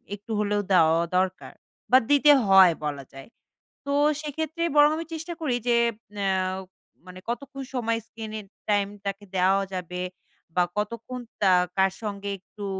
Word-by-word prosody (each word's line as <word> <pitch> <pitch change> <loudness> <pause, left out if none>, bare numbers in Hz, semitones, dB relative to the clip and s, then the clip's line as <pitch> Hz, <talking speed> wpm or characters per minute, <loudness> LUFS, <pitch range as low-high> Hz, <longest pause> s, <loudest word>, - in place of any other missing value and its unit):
একটু 205 +3 -12
হলেও 205 0 +1
দেওয়াও 165 -1 +5
দরকার। 185 0 -1 0.4
বা 255 - +9
দিতে 290 +1 +6
হয় 190 -3 +7
বলা 140 -2 -3
যায়, 135 0 -11 0.6
তো 280 - -3 0.3
সেক্ষেত্রে 315 +2 -3
বরং 295 0 +7
আমি 330 - -4
চেষ্টা 330 +2 -5
করি 265 -6 0
যে, 240 - +4 0.4
অ্যাও 190 -2 0 0.5
মানে 185 0 -11
কতক্ষণ 275 +3 -5
সময় 230 -2 0
স্ক্রিনের 215 -1 -7 0.2
টাইম 205 -1 +2 0.2
তাকে 200 +1 -4
দেওয়া 190 +2 +3
যাবে? 180 0 -4 0.5
বা 180 - +4
কতক্ষণ 230 +4 -4 0.2
তা 195 - +5 0.3
কার 190 0 +4
সঙ্গে 200 -1 -4
একটু 200 +2 -10
205 Hz, 145 wpm, -25 LUFS, 185-250 Hz, 0.6 s, বা